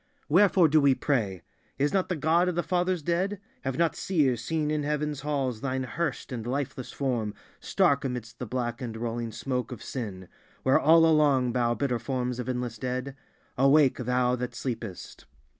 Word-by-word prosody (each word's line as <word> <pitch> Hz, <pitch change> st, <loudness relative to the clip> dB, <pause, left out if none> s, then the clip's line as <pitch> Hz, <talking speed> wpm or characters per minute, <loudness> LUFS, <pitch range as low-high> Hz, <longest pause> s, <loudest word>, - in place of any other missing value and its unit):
Wherefore 185 Hz, +1 st, +5 dB
do 155 Hz, 0 st, +4 dB
we 140 Hz, -2 st, +4 dB
pray? 105 Hz, -, -1 dB, 0.3 s
Is 145 Hz, +5 st, +1 dB
not 190 Hz, -2 st, +1 dB
the 180 Hz, -, 0 dB
God 165 Hz, +4 st, +2 dB
of 180 Hz, -, -3 dB
the 175 Hz, -, 0 dB
fathers 180 Hz, 0 st, 0 dB
dead? 185 Hz, +5 st, 0 dB, 0.2 s
Have 135 Hz, -1 st, -3 dB
not 170 Hz, -1 st, +2 dB
seers 135 Hz, -, +1 dB
seen 155 Hz, +2 st, -1 dB
in 155 Hz, -1 st, 0 dB
Heaven's 150 Hz, 0 st, -2 dB
halls 135 Hz, -5 st, -2 dB
Thine 130 Hz, -1 st, -1 dB
hearsed 160 Hz, +4 st, -3 dB
and 120 Hz, -2 st, -5 dB
lifeless 130 Hz, -1 st, -3 dB
form 120 Hz, -6 st, -2 dB, 0.2 s
stark 140 Hz, -1 st, +2 dB
amidst 125 Hz, -4 st, -5 dB
the 125 Hz, -, -4 dB
black 120 Hz, +1 st, -3 dB
and 115 Hz, -3 st, -5 dB
rolling 115 Hz, 0 st, -3 dB
smoke 125 Hz, +1 st, -3 dB
of 125 Hz, -, -7 dB
sin; 100 Hz, -8 st, -6 dB, 0.4 s
where 130 Hz, -, +4 dB
all 165 Hz, +2 st, +6 dB
along 145 Hz, -6 st, +3 dB
bow 120 Hz, -1 st, +1 dB
bitter 125 Hz, 0 st, -1 dB
forms 125 Hz, -2 st, -2 dB
of 125 Hz, 0 st, -4 dB
endless 125 Hz, -3 st, -3 dB
dead? 130 Hz, +2 st, -3 dB, 0.4 s
Awake, 135 Hz, 0 st, +5 dB
Thou 125 Hz, 0 st, +1 dB
that 125 Hz, 0 st, -4 dB
sleepest! 115 Hz, -7 st, -6 dB
130 Hz, 175 wpm, -27 LUFS, 120-150 Hz, 0.4 s, all